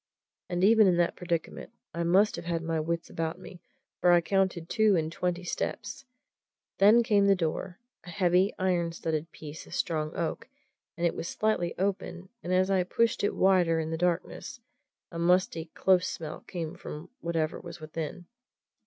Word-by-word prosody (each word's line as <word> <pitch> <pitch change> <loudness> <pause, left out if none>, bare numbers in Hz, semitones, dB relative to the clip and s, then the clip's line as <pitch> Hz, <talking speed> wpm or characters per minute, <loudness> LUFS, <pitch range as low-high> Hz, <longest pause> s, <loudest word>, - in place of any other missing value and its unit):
And 175 0 -1
even 215 0 +6
in 180 -2 +3
that 175 -1 +2
predicament 170 -2 -4 0.2
I 170 - -3
must 185 +5 +3
have - - -7
had 170 -1 -2
my 165 -1 -1
wits 165 +2 -2
about 160 0 -3
me, 175 - -12 0.4
for 180 - +4
I 175 - +7
counted 185 -2 0
two 220 -1 +3
and 160 -2 0
twenty 180 +1 -2
steps. 210 +8 -4 0.7
Then 215 +4 +7
came 205 -4 +3
the 200 - +5
door 175 +1 -3 0.3
a - - -11
heavy, 180 +1 +2
iron 175 -3 0
studded 160 -1 -3
piece 155 0 -9
of - - -7
strong 155 -2 -1
oak, 175 +8 -3 0.5
and 170 - 0
it 170 - +2
was 170 - -5
slightly 210 -6 -1
open, 185 -1 -3
and 175 - -5
as 185 +1 +3
I 190 -1 +3
pushed 230 +5 +1
it 205 - +1
wider 180 -4 +3
in 160 0 -3
the - - -1
darkness, 175 +7 -2 0.5
a 170 - -5
musty, 170 -1 +2
close 185 -1 +3
smell 155 -2 -6
came 165 -4 -4
from 150 +3 -9
whatever 165 -2 -1
was 170 -1 -9
within. 160 +3 -6
175 Hz, 175 wpm, -29 LUFS, 165-190 Hz, 0.7 s, I